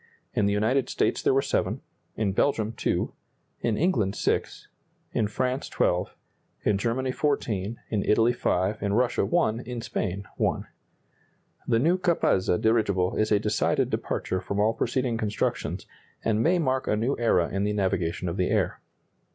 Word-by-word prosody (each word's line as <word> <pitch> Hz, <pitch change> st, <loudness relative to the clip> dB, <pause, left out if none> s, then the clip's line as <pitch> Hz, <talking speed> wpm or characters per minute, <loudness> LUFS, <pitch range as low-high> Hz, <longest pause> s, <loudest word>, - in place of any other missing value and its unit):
In 100 Hz, -, +2 dB
the 100 Hz, -, +1 dB
United 115 Hz, +6 st, +1 dB
States -, -, 0 dB
there -, -, +3 dB
were 135 Hz, +1 st, +3 dB
7; -, -, 0 dB, 0.4 s
in 105 Hz, -3 st, +1 dB
Belgium, 110 Hz, 0 st, +1 dB
2; 115 Hz, -, -1 dB, 0.5 s
in 115 Hz, -3 st, 0 dB
England, 110 Hz, -, +1 dB
6; -, -, -1 dB, 0.4 s
in 105 Hz, -, +1 dB
France, 130 Hz, +5 st, -2 dB
12; 90 Hz, 0 st, 0 dB, 0.5 s
in 100 Hz, -2 st, +2 dB
Germany, 130 Hz, +4 st, 0 dB
14; 115 Hz, -7 st, -1 dB
in 105 Hz, -3 st, +1 dB
Italy, 115 Hz, +3 st, +3 dB
5; 100 Hz, -2 st, 0 dB
in 100 Hz, -1 st, 0 dB
Russia, 120 Hz, +3 st, +2 dB
1; 140 Hz, -11 st, +1 dB
in 125 Hz, 0 st, -6 dB
Spain, 100 Hz, -3 st, -3 dB
1. -, -, 0 dB, 1.0 s
The 115 Hz, -, +3 dB
new 170 Hz, +10 st, +2 dB
Capazza 160 Hz, -, +2 dB
dirigible 100 Hz, -5 st, +2 dB
is 110 Hz, 0 st, +1 dB
a 105 Hz, -, +6 dB
decided 105 Hz, +1 st, +1 dB
departure 95 Hz, -, -2 dB
from 100 Hz, +2 st, -3 dB
all 110 Hz, +2 st, +3 dB
preceding 120 Hz, -1 st, -1 dB
constructions, 105 Hz, -1 st, -2 dB, 0.4 s
and 110 Hz, -1 st, +2 dB
may 175 Hz, +8 st, +3 dB
mark 130 Hz, -5 st, 0 dB
a -, -, +2 dB
new 120 Hz, +6 st, 0 dB
era 95 Hz, -7 st, +2 dB
in 100 Hz, +1 st, -1 dB
the 105 Hz, -, +1 dB
navigation 90 Hz, -3 st, -1 dB
of 85 Hz, +2 st, -3 dB
the 90 Hz, -, +1 dB
air. -, -, 0 dB
110 Hz, 160 wpm, -26 LUFS, 100-125 Hz, 1.0 s, a